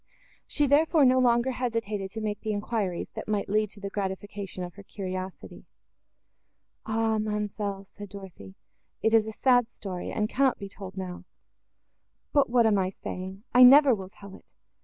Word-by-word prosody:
She, 295 - +1
therefore, 295 +2 +4
no 255 0 +5
longer 240 0 +3
hesitated 230 -6 -2
to 220 +3 -6
make 210 -1 -3
the 215 -1 -2
enquiries, 205 -4 -2
that - - -7
might 210 -1 -1
lead 215 +1 +1
to 205 - -12
the 200 0 -6
gratification 195 -1 -4
of 175 -1 -7
her 200 - -12
curiosity. 185 -2 -7 1.2
"Ah, 220 0 +1
ma'amselle!" 210 -2 -3
said 205 +1 -11
Dorothée, 185 - -11 0.5
"it 220 - +2
is 220 -1 +4
a - - -4
sad 245 +1 +3
story, 185 -6 -6
and 210 -1 0
cannot 265 +2 +2
be 200 - -7
told 195 -1 -10
now: 185 -1 -6 1.1
but 285 -4 +4
what 240 -1 +4
am 210 -3 +3
I 185 -1 0
saying? 190 +1 -7
I 250 - +6
never 270 +2 +9
will 190 -4 -5
tell 200 -1 -13
it. - - -19
210 Hz, 170 wpm, -27 LUFS, 195-235 Hz, 1.2 s, never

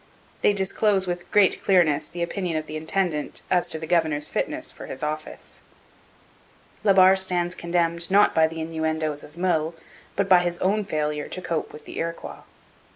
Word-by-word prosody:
They 205 - +4
disclose 195 0 +1
with 175 -1 -4
great 205 -2 +3
clearness 155 -6 +3
the 175 0 -4
opinion 175 -2 -2
of 155 - -3
the 155 - -7
intendant 160 -1 -2
as 180 -1 +2
to - - +1
the 160 - -6
governor's 155 -3 +1
fitness - - -2
for - - -10
his 130 - -7
office. 155 +1 -6 1.2
La 205 - +5
Barre 190 0 +7
stands 180 -2 0
condemned 170 0 -1
not 200 +2 +5
by 160 0 +4
the 160 0 -6
innuendoes 160 -2 -2
of 150 +3 -15
Meulles, 165 -3 0 0.4
but 200 -1 0
by 185 -2 +7
his 175 -1 -1
own 205 +3 0
failure 150 -4 -2
to - - -6
cope 170 -3 -3
with 150 - -12
the - - -7
Iroquois. 165 0 -5
170 Hz, 175 wpm, -24 LUFS, 155-185 Hz, 1.2 s, Barre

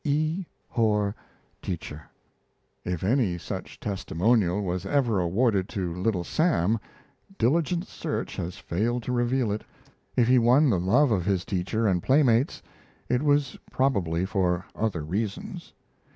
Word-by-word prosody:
E. 155 +5 0 0.2
Horr, 105 -4 +1 0.5
Teacher. 80 -4 -6 0.7
If 90 -1 -3
any 105 -4 +2
such - - -7
testimonial 100 0 +1
was 90 -1 -2
ever 120 -8 +1
awarded 95 +2 +1
to 90 -4 -3
Little 90 0 -1
Sam, 115 - +1 0.6
diligent 170 +7 +1
search - - -4
has 90 +2 -4
failed 115 +7 -1
to 125 - -3
reveal 120 -1 +1
it. 105 - -3 0.5
If 120 -2 +3
he 125 0 +5
won 125 +4 +5
the 95 - +2
love 120 +10 +3
of 95 -5 +1
his 95 -2 0
teacher 100 +4 -1
and 90 -4 +2
playmates 130 - +3 0.5
it 125 +1 +2
was 145 -2 +1
probably 95 -10 +1
for 90 -2 0
other 100 -8 -1
reasons. 100 +6 -4
105 Hz, 135 wpm, -26 LUFS, 90-125 Hz, 0.7 s, he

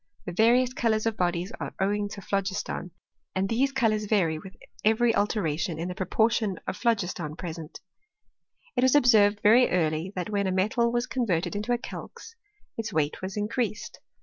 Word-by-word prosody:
The - - -4
various 240 +6 +3
colours 220 -3 +1
of 225 -1 0
bodies 175 0 -1
are - - -5
owing 205 +1 0
to 200 - -8
phlogis 195 +1 -1
ton, 180 - -5 0.5
and 190 +1 +1
these 255 +6 +1
colours 220 -5 +1
vary 180 -7 +1
with 190 +3 -12 0.3
every 225 +2 +3
alteration 170 -6 0
in 170 +3 -3
the - - -3
proportion 215 +2 +1
of - - -3
phlogiston 180 -10 -1
present. 165 -2 -7 0.9
It 250 - +2
was 260 +2 +4
observed 215 -6 +5
very 235 +4 +6
early 160 0 0
that 180 +3 -3
when 200 -1 0
a - - 0
metal 220 +6 +1
was 240 +1 0
converted 195 -9 -1
into 210 +4 -2
a 240 - +3
calx 450 - -9 0.4
its 225 0 -3
weight 155 -4 -1
was 190 +2 -5
increased. 215 +1 -2
205 Hz, 175 wpm, -27 LUFS, 180-230 Hz, 0.9 s, very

